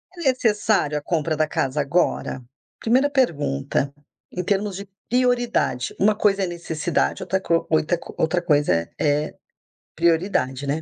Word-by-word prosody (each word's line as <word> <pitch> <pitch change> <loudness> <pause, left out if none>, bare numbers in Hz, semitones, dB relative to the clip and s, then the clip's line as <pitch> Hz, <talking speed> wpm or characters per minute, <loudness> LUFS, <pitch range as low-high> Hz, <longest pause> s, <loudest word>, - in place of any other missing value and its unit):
É - - -12
necessário 210 - +1
a - - -3
compra 155 0 -1
da 155 - +2
casa 135 -1 -1
agora? 140 -4 0 0.4
1ª 260 +5 +3
pergunta, 140 - 0 0.4
em 180 - -3
termos 200 +1 0
de 200 +1 -8 0.2
prioridade. 245 - +1
Uma 210 +2 +4
coisa 200 -2 +2
é - - 0
necessidade, 170 -1 -1
outra 190 - 0
co 170 -3 0
oitra 160 +2 +2
co - - -11
outra 160 +2 +1
coisa 150 - +2
é 85 0 -1
é 150 0 0 0.6
prioridade, 160 -6 +1
né. 150 +3 -1
170 Hz, 150 wpm, -23 LUFS, 145-205 Hz, 0.6 s, Uma